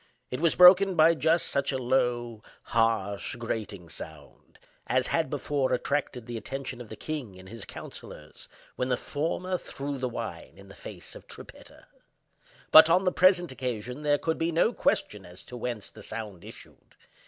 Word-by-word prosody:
It 125 - -3
was 165 0 +2
broken 185 +1 +8
by 160 +1 +6
just 165 +1 +2
such 140 +1 -1
a 135 - -1
low, 120 -3 0 0.2
harsh, 110 -4 0
grating 110 -6 -5
sound, 80 -2 -12 0.3
as - - +2
had - - 0
before 140 -3 -1
attracted 125 -2 -2
the 120 -1 -5
attention 130 +2 -6
of 115 - -10
the 110 - -7
king 130 -9 -6
and 95 0 -13
his 115 +1 -9
councillors 75 0 -11 0.3
when 125 - -2
the 125 - +1
former 180 +5 -2
threw 140 -2 -5
the 130 -1 -1
wine - - -7
in - - -15
the - - -12
face - - -10
of - - -13
Trippetta. - - -12 0.9
But, 160 +1 +10
on 180 +3 +4
the 180 - +2
present 180 -3 +4
occasion, 125 0 -4
there 145 -1 +2
could 160 +2 -2
be 165 +1 0
no 170 +8 +2
question 105 - 0
as 90 0 -12
to 125 - -10
whence 120 -4 -5
the 110 - -13
sound 105 -4 -6
issued. - - -14
125 Hz, 175 wpm, -28 LUFS, 110-155 Hz, 0.9 s, But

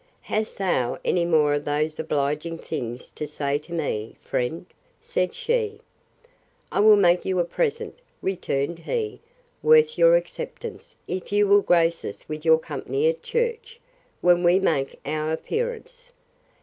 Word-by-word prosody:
Hast 215 +1 -3
thou 175 -11 0
any 175 -1 +2
more 155 -3 +3
of 145 0 -1
these 155 +1 -1
obliging 150 +2 -1
things 120 -5 -6
to 150 - -5
say 145 -1 -1
to 155 +3 -18
me, 135 -10 -3
friend? 125 +8 -2 0.3
said 180 -1 -2
she. 450 -3 -1 0.9
I - - 0
will 215 +1 +8
make 180 -3 +4
you 190 -1 -1
a 175 - +3
present, 465 - -2 0.2
returned 170 -4 -2
he, 440 - -3 0.4
worth 465 0 +5
your - - +7
acceptance, 485 -2 -5
if 185 +1 -5
you 205 0 +3
will 200 +1 +6
grace 170 -2 +2
us 100 - -8
with 155 0 -6
your 160 -1 +6
company 415 - -2
at 485 0 -3
church, 470 -1 -2 0.4
when 175 0 +4
we 175 +1 +5
make 135 -8 0
our 155 +1 -1
appearance. 485 - -4
175 Hz, 150 wpm, -24 LUFS, -, 0.9 s, will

